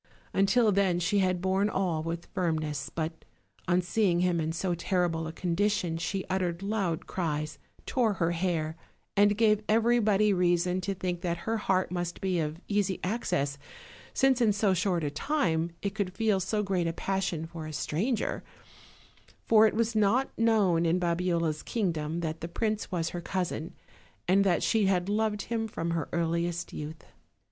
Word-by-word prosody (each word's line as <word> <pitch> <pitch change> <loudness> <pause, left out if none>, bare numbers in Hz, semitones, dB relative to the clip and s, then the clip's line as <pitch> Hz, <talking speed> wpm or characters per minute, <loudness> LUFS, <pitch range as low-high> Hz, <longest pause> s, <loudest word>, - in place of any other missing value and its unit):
Until 210 +3 +4
then 190 -3 +2
she 195 +4 +1
had 185 -2 +1
borne 190 +2 +2
all 180 -6 0
with 165 +1 -4
firmness; 155 -6 -1
but 160 0 -4 0.4
on 180 0 +3
seeing 175 -2 +2
him 180 -2 +2
in 160 0 -1
so 175 +2 -1
terrible 170 -2 0
a - - -4
condition 180 +1 0
she 190 +3 -2
uttered 180 -1 -1
loud 195 -6 -1
cries, 155 -4 -3 0.3
tore 235 -5 +1
her 170 -3 0
hair, 165 -3 -1 0.4
and 205 0 +4
gave 215 -2 +4
everybody 215 -2 +3
reason 180 0 +2
to 195 +1 -2
think 180 -2 -3
that 170 -1 -3
her 225 0 0
heart 190 -4 0
must 175 -1 -3
be 185 -2 0
of 155 +1 -2
easy 200 -2 0
access, 175 -9 -1 0.5
since 265 -2 +3
in 220 -3 +4
so 205 -1 +2
short 180 -2 0
a 145 - -1
time 170 - 0
it 200 -1 -1
could 195 -3 -3
feel 215 -4 +2
so 210 +3 -1
great 185 -4 0
a 165 - -1
passion 185 -4 -2
for 160 -1 -7
a - - -6
stranger; 185 - -1 1.0
for 220 -1 +6
it - - -2
was 230 0 +1
not 215 +6 +2
known 210 -7 +3
in 170 +1 +2
Babiola's 170 -3 0
kingdom 170 -6 -2
that 160 -1 -3
the 165 - -3
prince 215 +4 -2
was 165 -3 -1
her 175 - -5
cousin, 175 -3 -3 0.5
and 195 +2 +4
that 180 -4 +2
she 220 -4 +2
had 185 0 +1
loved 210 -1 0
him 225 -1 -2
from 170 -5 -3
her 165 -2 -2
earliest 170 +1 -1
youth. 155 +1 -7
180 Hz, 170 wpm, -29 LUFS, 165-205 Hz, 1.0 s, for